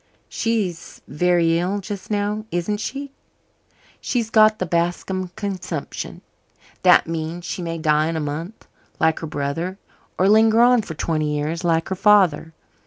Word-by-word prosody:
"She's 210 -7 -2
very 170 +1 +2
ill 190 +4 -1
just 200 0 -7
now, 210 +1 -1
isn't 175 +5 -2
she?" 275 +5 -5 0.9
"She's 230 -3 -2
got 215 0 +5
the 185 - -2
Bascom 175 +2 -1
consumption. 185 -7 -5 0.6
That - - +6
means 165 +1 -4
she 180 - -4
may 165 -1 -4
die 155 -1 +2
in 165 - -2
a - - -1
month, 160 +8 -5 0.3
like 160 -1 +2
her 160 - -5
brother, 155 +6 -3 0.4
or 185 - +3
linger 220 +2 +5
on 245 0 +5
for 165 -6 -8
twenty 155 -1 -1
years, 160 +4 -3
like 165 -1 +1
her 190 - -1
father. 190 -5 +3
175 Hz, 150 wpm, -21 LUFS, 165-210 Hz, 0.9 s, That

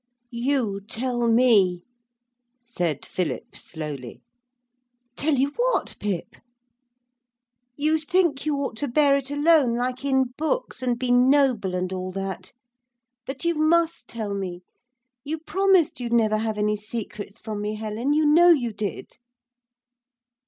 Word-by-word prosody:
'You 235 -5 -1
tell 240 +1 -1
me,' 215 -7 +4 0.8
said 175 - -3
Philip 170 -8 -4
slowly. 150 -7 -8 0.9
'Tell 305 0 +1
you 270 +2 +2
what, - - 0
Pip?' 200 -5 -4 1.4
'You 310 +2 +2
think 315 -3 +1
you 305 -1 0
ought 275 -4 -3
to 290 - -2
bear 280 +2 +4
it 275 -1 -2
alone, 290 -4 +3
like 250 +2 -2
in 265 -2 +1
books, 320 - -2
and 245 -2 0
be 250 0 -1
noble 250 -6 +3
and 180 +1 -2
all 185 0 -4
that. 190 -1 -5 0.8
But 270 +4 -5
you 340 - +3
must 330 -1 +1
tell 215 -3 -4
me; 185 -2 -5 0.6
you 305 +3 -3
promised 375 0 +2
you'd 240 -1 -3
never 215 -2 +3
have 220 -1 -2
any 210 0 +1
secrets 210 -1 -7
from 215 -2 -5
me, 210 +1 -3
Helen, 220 +5 -2
you 305 +1 +2
know 335 +4 +6
you 250 -9 +3
did.' 210 -1 -5
245 Hz, 135 wpm, -24 LUFS, 210-290 Hz, 1.4 s, know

